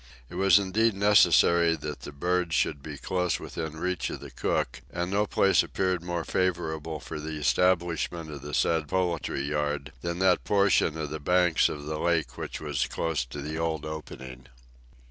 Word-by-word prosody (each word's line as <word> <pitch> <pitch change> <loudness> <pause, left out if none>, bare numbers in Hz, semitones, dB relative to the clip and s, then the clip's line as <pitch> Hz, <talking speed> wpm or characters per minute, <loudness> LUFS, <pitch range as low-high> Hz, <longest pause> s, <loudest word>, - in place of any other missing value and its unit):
It - - -10
was 95 +1 +5
indeed 105 +3 +1
necessary 85 -4 +5
that 75 -1 -6
the - - -8
birds 90 +2 0
should 70 - 0
be 75 0 -7
close 90 +1 -1
within 80 -1 -6
reach 90 +1 -2
of - - -6
the - - -10
cook, 65 +1 -2
and 90 +3 -3
no 105 +1 +1
place 95 0 +4
appeared 95 -2 -1
more 85 -1 -3
favorable 80 -4 -1
for 75 - -7
the 80 +1 -5
establishment 85 0 +1
of 70 -2 -8
the 75 0 -5
said 80 -2 +1
poultry 85 -5 -1
yard 75 -1 -2
than 85 0 -3
that 95 -1 +3
portion 100 -5 +2
of 75 -2 -4
the 80 - -4
banks 90 +2 +3
of 75 -1 -6
the 75 0 -4
lake 85 -2 0
which - - -6
was 75 -4 -1
close 80 -5 -1
to 70 +4 -7
the 80 +2 -4
old 80 -2 -2
opening. 65 -5 -8
80 Hz, 180 wpm, -27 LUFS, 75-90 Hz, -, was